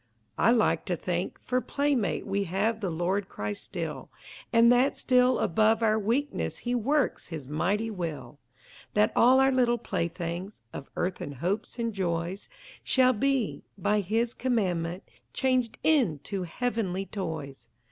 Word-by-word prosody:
I 225 Hz, -, +5 dB
like 235 Hz, -2 st, +3 dB
to 180 Hz, -, 0 dB
think, 175 Hz, +1 st, -3 dB
for 255 Hz, 0 st, 0 dB
playmate 270 Hz, -5 st, 0 dB
We 200 Hz, 0 st, -1 dB
have 205 Hz, +5 st, 0 dB
the 195 Hz, -, -1 dB
Lord 185 Hz, +4 st, -1 dB
Christ 105 Hz, 0 st, -4 dB
still, 155 Hz, +6 st, -5 dB, 0.4 s
And 230 Hz, 0 st, +6 dB
that 250 Hz, +3 st, +3 dB
still 250 Hz, 0 st, +3 dB
above 220 Hz, +5 st, +2 dB
our 220 Hz, 0 st, +3 dB
weakness 225 Hz, -, -1 dB
He 240 Hz, -, -3 dB
works 270 Hz, +5 st, 0 dB
His 155 Hz, -6 st, -7 dB
mighty 200 Hz, +9 st, 0 dB
will, 165 Hz, -6 st, -5 dB, 0.6 s
That 210 Hz, +2 st, +4 dB
all 255 Hz, +3 st, +6 dB
our 265 Hz, 0 st, +5 dB
little 245 Hz, -2 st, +3 dB
playthings 175 Hz, -1 st, -3 dB, 0.2 s
Of 140 Hz, -, -8 dB
earthen 180 Hz, -5 st, -3 dB
hopes 180 Hz, -, -3 dB
and 230 Hz, -1 st, -2 dB
joys 175 Hz, 0 st, -2 dB, 0.3 s
Shall 255 Hz, -1 st, +4 dB
be, 265 Hz, -1 st, 0 dB, 0.2 s
by 210 Hz, +3 st, +1 dB
His 225 Hz, +5 st, 0 dB
commandment, 185 Hz, -8 st, -1 dB, 0.3 s
Changed 250 Hz, -3 st, +1 dB
into 195 Hz, -, +1 dB
heavenly 195 Hz, -1 st, -2 dB
toys. 160 Hz, -, -6 dB
205 Hz, 140 wpm, -28 LUFS, 175-240 Hz, 0.6 s, And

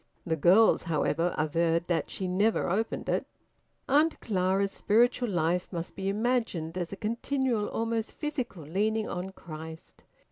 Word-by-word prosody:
(The 160 Hz, -, 0 dB
girls, 185 Hz, +8 st, +5 dB
however, 165 Hz, +1 st, 0 dB
averred 165 Hz, +2 st, +1 dB
that 175 Hz, -2 st, -1 dB
she 190 Hz, -, -3 dB
never 200 Hz, +5 st, +2 dB
opened 215 Hz, +6 st, -1 dB
it.) -, -, 0 dB, 0.6 s
Aunt 300 Hz, +4 st, +3 dB
Clara's 195 Hz, -1 st, +1 dB
spiritual 240 Hz, +4 st, +2 dB
life 175 Hz, -1 st, 0 dB
must 170 Hz, -2 st, -5 dB
be 195 Hz, 0 st, -2 dB
imagined 210 Hz, -7 st, -1 dB
as 175 Hz, -2 st, -3 dB
a -, -, -4 dB
continual, 235 Hz, +1 st, -1 dB
almost 225 Hz, 0 st, -2 dB
physical 255 Hz, -, -4 dB
leaning 215 Hz, +8 st, 0 dB
on 180 Hz, +1 st, -4 dB
Christ. 160 Hz, -3 st, -10 dB
195 Hz, 140 wpm, -29 LUFS, 170-225 Hz, 0.6 s, girls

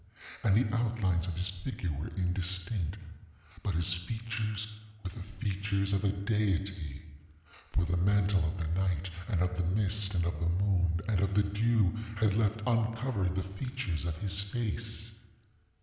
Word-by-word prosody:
And 100 Hz, -4 st, +5 dB
the 115 Hz, -2 st, +2 dB
outlines 105 Hz, -7 st, +1 dB
of 90 Hz, -, -2 dB
his 90 Hz, +2 st, 0 dB
figure 95 Hz, -1 st, -3 dB
were 75 Hz, +1 st, -3 dB
indistinctŌĆöbut 90 Hz, 0 st, -3 dB
his 85 Hz, +1 st, +3 dB
features 110 Hz, +2 st, -3 dB, 0.4 s
were 95 Hz, -, -4 dB
the 100 Hz, -, -8 dB
features 100 Hz, -1 st, -1 dB
of 100 Hz, 0 st, +1 dB
a 100 Hz, -, +3 dB
deity; 95 Hz, -, -1 dB, 0.7 s
for 85 Hz, -, +2 dB
the 90 Hz, +1 st, +1 dB
mantle 100 Hz, 0 st, +4 dB
of 85 Hz, +4 st, -1 dB
the 85 Hz, -3 st, -2 dB
night, 90 Hz, -2 st, 0 dB, 0.2 s
and 90 Hz, -6 st, +2 dB
of 90 Hz, 0 st, 0 dB
the 90 Hz, +1 st, 0 dB
mist, 100 Hz, -1 st, +2 dB
and 85 Hz, -1 st, +2 dB
of 85 Hz, -3 st, -1 dB
the 85 Hz, 0 st, +1 dB
moon, 90 Hz, -2 st, +2 dB
and 105 Hz, -4 st, +2 dB
of 100 Hz, +1 st, +1 dB
the 105 Hz, -, +5 dB
dew, 105 Hz, 0 st, +2 dB, 0.2 s
had 105 Hz, -2 st, +3 dB
left 110 Hz, 0 st, +2 dB
uncovered 115 Hz, -4 st, +1 dB
the 95 Hz, -, 0 dB
features 100 Hz, -, -3 dB
of 85 Hz, -2 st, -2 dB
his 95 Hz, 0 st, -1 dB
face. 110 Hz, +1 st, -3 dB
100 Hz, 160 wpm, -32 LUFS, 90-105 Hz, 0.7 s, And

